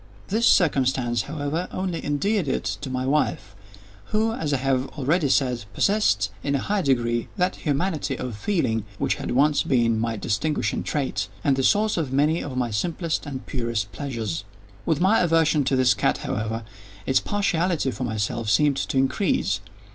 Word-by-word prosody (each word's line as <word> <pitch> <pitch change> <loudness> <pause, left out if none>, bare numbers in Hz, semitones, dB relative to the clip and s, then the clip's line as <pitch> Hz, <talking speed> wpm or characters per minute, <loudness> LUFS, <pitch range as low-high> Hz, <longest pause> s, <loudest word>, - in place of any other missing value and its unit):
This 225 +4 +2
circumstance, 130 -7 +3
however, 150 +4 -3
only 185 -3 -3
endeared 180 +5 0
it - - -1 0.2
to - - -5
my 130 0 -2
wife, 145 -6 0 0.5
who, 220 +1 0
as 155 -8 -2
I 140 - +2
have 130 0 0
already 150 +2 +1
said, 125 -5 +1
possessed, 110 - +2
in 140 0 0
a 135 - -2
high 205 -1 +1
degree, 120 -5 +1
that 180 0 +1
humanity 150 -2 -1
of 125 -4 -4
feeling 115 - 0
which - - +1
had - - -4
once 145 +3 +3
been 115 -4 +2
my 115 0 -1
distinguishing 115 +9 -1
trait, 145 -3 -2 0.2
and 140 -2 +3
the 135 - 0
source 210 +8 +2
of 150 -6 -1
many 150 +5 +2
of 130 -3 -5
my 120 -2 0
simplest 165 - -2
and 135 -2 -6
purest 115 -5 -2
pleasures. 110 - -4 0.4
With 160 -3 +2
my 195 +5 +4
aversion 165 -3 +3
to 135 - +2
this 130 -1 +4
cat, - - +1
however, 110 +2 -2 0.4
its 130 - +3
partiality 180 -7 0
for 120 +2 -5
myself 110 -1 -2
seemed 145 +3 +3
to 140 +1 -2
increase. 135 0 +1
140 Hz, 170 wpm, -24 LUFS, 120-165 Hz, 0.5 s, my